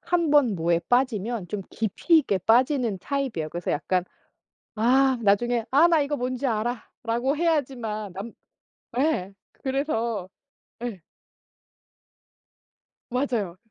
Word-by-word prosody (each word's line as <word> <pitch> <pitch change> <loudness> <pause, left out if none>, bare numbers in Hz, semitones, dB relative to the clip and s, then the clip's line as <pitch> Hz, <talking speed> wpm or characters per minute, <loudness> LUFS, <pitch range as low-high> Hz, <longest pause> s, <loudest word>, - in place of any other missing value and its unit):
1 340 -3 +1
번 275 -8 +4
뭐에 170 0 +1
빠지면 235 -5 0
좀 200 0 -4
깊이 225 - +2
있게 205 -10 0
빠지는 240 - +2
타입이에요. 260 - -2
그래서 175 +2 -3
약간 180 +4 0 0.7
아 255 +4 +3
나중에 230 +3 +2
"아 305 +6 +6
나 325 -3 +4
이거 290 +1 -1
뭔지 255 +2 -2
알아."라고 240 +3 -2
해야지만 245 - -1
남 205 +5 -6 0.7
예. 255 -10 0 0.2
그래서 235 - -2 0.5
예. 210 -8 -5 2.1
맞아요. 235 -8 -1
240 Hz, 225 characters per minute, -25 LUFS, 200-270 Hz, 2.1 s, 아